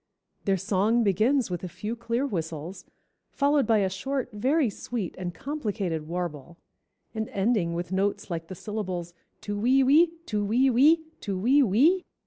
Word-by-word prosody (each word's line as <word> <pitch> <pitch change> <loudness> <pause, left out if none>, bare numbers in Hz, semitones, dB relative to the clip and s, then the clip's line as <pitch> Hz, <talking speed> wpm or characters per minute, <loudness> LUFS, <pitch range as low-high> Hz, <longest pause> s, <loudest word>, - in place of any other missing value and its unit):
Their 195 -1 +2
song 205 +5 +1
begins 220 +4 +2
with 175 0 -4
a - - -3
few 215 +6 -5
clear 235 +3 -1
whistles, 170 - -5 0.4
followed 285 0 +2
by 225 -2 +4
a 195 - +2
short, 265 +5 -3
very 265 +7 +2
sweet, 210 -2 -4
and 180 -1 -4
complicated 200 - -3
warble, 170 -2 -5 0.6
and 220 -1 -3
ending 195 -4 0
with 175 +1 -4
notes 195 0 -1
like 165 -1 -4
the 185 - -7
syllables 185 -4 -5 0.3
tu 205 - -4
we 260 +5 +4
we, 300 +6 +6 0.2
tu 210 -6 -1
we 245 +6 +3
we, 305 +7 +5 0.2
tu 195 -2 -3
we 255 +9 +4
we. 280 - +4
210 Hz, 160 wpm, -27 LUFS, 180-255 Hz, 0.6 s, we